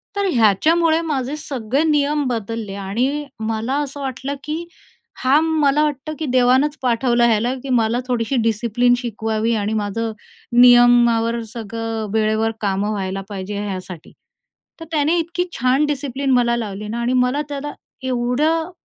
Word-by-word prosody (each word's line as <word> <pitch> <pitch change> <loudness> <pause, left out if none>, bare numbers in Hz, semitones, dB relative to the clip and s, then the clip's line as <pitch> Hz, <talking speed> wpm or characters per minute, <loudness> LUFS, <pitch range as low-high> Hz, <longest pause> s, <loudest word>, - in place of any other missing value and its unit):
तर 400 -1 0
ह्याच्यामुळे 315 - +3
माझे 270 0 -2
सगळे 270 -2 -2
नियम 295 -1 +2
बदलले 225 -3 -4
आणि 245 +10 -2
मला 220 +3 -2
असं 285 0 -6
वाटलं, 270 +1 -4
की 315 +3 -4 0.6
हां, 270 +4 +4
मला 305 -2 +2
वाटतं, 300 0 -2
की 315 - -2
देवानंच 260 +3 +3
पाठवलं 240 -1 +2
याला, 230 +3 +1
की 275 - -6
मला 235 -1 +2
थोडीशी 245 0 -1
डिसिप्लिन 235 +2 +2
शिकवावी 225 -1 -2
आणि 210 0 -1
माझं 220 +2 -2 0.5
नियमावर 240 -1 +5
सगळं, 225 0 -5
वेळेवर 220 0 +1
कामं 200 0 0
व्हायला 195 -2 -3
पाहिजे 200 0 -5
ह्यासाठी. 185 -4 -7 0.7
तर 325 - -8
त्याने 310 +2 +2
इतकी 340 +2 -2 0.2
छान 255 +4 +3
डिसिप्लिन 280 -2 -2
मला 240 -1 +3
लावली 210 -2 -5
ना 230 +3 -4
आणि 240 +2 0
मला 250 +3 +2
त्याला 290 0 -5 0.3
एवढं 260 +7 0
245 Hz, 140 wpm, -20 LUFS, 220-285 Hz, 0.7 s, नियमावर